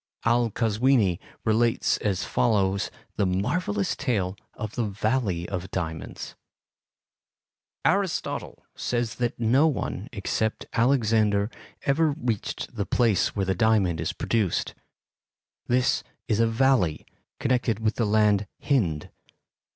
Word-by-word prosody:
Al 120 0 +3
Kazwini 110 -3 +2 0.3
relates 115 +1 +2
as 95 -3 -1
follows 100 -4 +1 0.3
the 100 - +2
marvellous 100 - 0
tale 100 -9 -1 0.2
of 110 -1 -5
the 120 - -1
Valley 100 -4 -1
of 95 -1 -4
Diamonds: 80 -3 -5 1.5
"Aristotle 195 -2 -1
says 120 -2 -1
that 120 -1 -1
no 125 +7 +4
one 150 - -3
except 110 0 -2
Alexander 110 -4 +2 0.3
ever 155 +3 +3
reached 120 -8 -3
the - - -2
place 115 -5 +2
where 100 -2 0
the 95 - +1
diamond 100 -7 +2
is - - -1
produced. 110 -7 -1 0.9
This 125 +1 +2 0.2
is 110 - +1
a 115 - +4
valley, 115 - +2 0.3
connected 120 -3 +1
with 110 -1 0
the 115 - +2
land 105 -1 +3
Hind. 90 - 0
110 Hz, 115 wpm, -26 LUFS, 100-120 Hz, 1.5 s, no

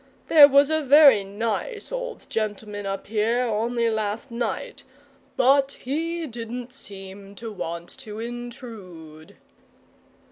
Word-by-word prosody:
There 300 -3 +10
was 280 +1 +4
a 315 0 +2
very 280 -6 +7
nice 225 - -4
old - - -5
gentleman 210 -1 -4
up 195 0 -4
here 225 +3 +1
only 235 +1 0
last 220 +2 -2
night, 235 -1 -4 0.5
but 275 +2 +4
he 330 +5 -3
didn't 240 0 -7
seem 195 -4 -10
to 225 +1 -7
want 170 -3 -6
to 215 -4 -8
intrude." 225 -10 -9
230 Hz, 115 wpm, -24 LUFS, 205-270 Hz, 0.5 s, There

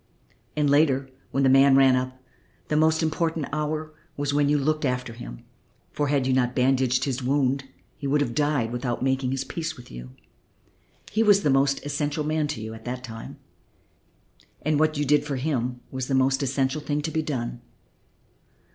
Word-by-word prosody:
And 150 -1 +2
later, 140 -2 +3 0.2
when 135 - 0
the - - +5
man 135 +1 +6
ran 135 -1 +6
up, 130 0 -3 0.5
the 150 - +1
most 160 +1 +3
important 160 -1 0
hour 155 +1 -2 0.2
was 145 0 -1
when 145 0 +2
you 150 - +3
looked 155 +2 0
after 125 -3 -1
him, - - -9 0.5
for, 145 - -1
had 140 -2 +1
you 130 - +2
not 125 -1 +1
bandaged 130 0 +2
his 135 -2 -2
wound, 135 +1 +1 0.3
he 140 - -4
would 145 +2 +2
have 130 -5 -1
died 145 -4 +1
without 120 0 -2
making 130 -1 +1
his 135 +1 -1
peace 160 +2 -5
with 125 - -13
you. - - -9 1.0
He 220 - +1
was 205 -2 +5
the 145 - +3
most 135 +1 +2
essential 145 +1 -1
man 155 0 0
to 150 - -4
you 110 0 -6
at 110 0 -11
that 125 +1 -4
time, 115 -2 -8 1.3
and 155 0 +1
what 155 -1 +2
you 145 - 0
did 145 +1 +3
for 145 -2 -3
him 125 -3 -2
was 130 -1 -3
the 135 - 0
most 135 +1 +2
essential 135 +2 0
thing 150 0 -2
to 160 - -2
be 160 - 0
done. 120 -5 -4
140 Hz, 190 wpm, -25 LUFS, 130-150 Hz, 1.3 s, man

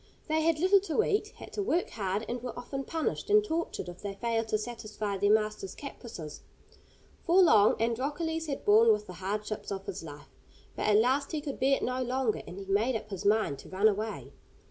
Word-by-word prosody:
They 315 0 +1
had 325 0 +2
little 375 +5 +5
to 405 +2 0
eat, 420 0 +1
had - - -11
to 415 - -2
work 355 -2 0
hard, 200 0 -2
and 245 0 -3
were 245 -1 -6
often 270 +3 -5
punished 325 +5 -2
and 420 0 +6
tortured 330 - -3
if 175 0 -9
they 200 -1 -5
failed 225 +1 -1
to 215 - +1
satisfy 215 -2 -4
their 205 +1 +3
master's 215 -3 0
caprices. 225 - -8 0.8
For 350 +3 +4
long 215 - +6
Androcles 295 +8 -1
had 280 -2 -4
borne 220 +2 +6
with 210 -1 +1
the 185 - -9
hardships 205 +4 -4
of 195 0 -4
his - - -5
life, 145 -2 -11 0.4
but - - -2
at 210 -1 +5
last 265 +7 +2
he 310 - 0
could 285 -2 -6
bear 270 +1 +4
it - - -6
no 255 +1 -1
longer, 255 -2 0
and 180 - -8
he 195 - -7
made 210 +6 +1
up 215 -1 -5
his 195 -1 -5
mind 205 -9 +2
to - - -12
run 195 +3 +3
away. 215 +1 -2
225 Hz, 210 wpm, -30 LUFS, 205-290 Hz, 0.8 s, and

